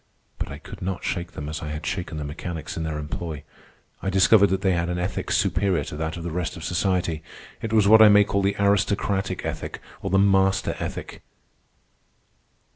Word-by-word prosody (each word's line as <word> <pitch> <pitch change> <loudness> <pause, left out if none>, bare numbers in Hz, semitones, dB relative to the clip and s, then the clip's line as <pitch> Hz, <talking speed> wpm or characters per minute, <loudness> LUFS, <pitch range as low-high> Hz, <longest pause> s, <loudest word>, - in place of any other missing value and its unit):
But - - -3
I 70 - -6
could 75 - -11
not 95 0 -3
shake 85 -1 -3
them 75 - -6
as 80 0 -5
I 80 - -5
had 75 +1 -5
shaken 85 -3 -3
the 75 - -3
mechanics 80 +2 -6
in 85 - -3
their 80 -1 -2
employ. 75 0 -5 0.6
I 95 - -1
discovered 95 +2 +5
that 95 +1 0
they 95 -1 +2
had 85 -1 0
an 90 - -1
ethic 90 +1 -3
superior 95 -7 +1
to - - -7
that 80 +2 -3
of 85 - -6
the 85 - -4
rest 90 0 -3
of 80 - -8
society. 90 -3 0 0.4
It 110 - -4
was 110 -3 +4
what 110 +1 +8
I 110 - +9
may 105 0 +7
call 100 0 0
the 100 +1 +1
aristocratic 100 -2 +1
ethic - - -4 0.2
or 95 - -3
the 95 - +3
master 95 -1 +3
ethic. - - -6
90 Hz, 200 wpm, -24 LUFS, 80-100 Hz, 0.6 s, I